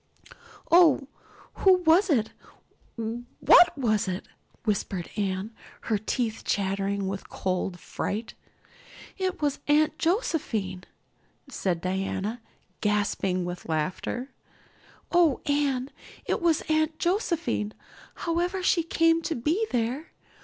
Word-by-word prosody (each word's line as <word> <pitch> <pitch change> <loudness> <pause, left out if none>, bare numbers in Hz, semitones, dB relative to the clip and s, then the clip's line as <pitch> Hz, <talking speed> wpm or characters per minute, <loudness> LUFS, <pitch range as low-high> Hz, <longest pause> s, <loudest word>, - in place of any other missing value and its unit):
"Oh, 325 -6 +6 0.5
who 380 - +7
was 350 +5 +5
it 225 -8 +2 0.6
what 240 +9 +4
was 215 -6 +1
it?" 185 +1 -4 0.4
whispered 195 -5 -2
Anne, 195 0 -2 0.3
her 215 -3 0
teeth 225 +1 -2
chattering 195 0 -1
with 195 0 -5
cold 185 0 -2
and 175 - -14
fright. 215 +6 -4 0.9
"It 370 -4 -2
was 290 -1 +1
Aunt 300 +1 +3
Josephine," 230 - -1 0.6
said 175 -3 -1
Diana, 195 +5 -2 0.4
gasping 200 -3 0
with 175 -1 -6
laughter. 185 - -2 0.8
"Oh, 345 -6 +4
Anne, 280 -2 0 0.3
it - - -1
was 335 -3 +3
Aunt 315 0 0
Josephine, 340 - -1 0.5
however 350 +2 0
she 350 - +3
came 330 0 +2
to 330 - -2
be 325 - 0
there. 250 +6 -2
245 Hz, 110 wpm, -27 LUFS, 195-325 Hz, 0.9 s, who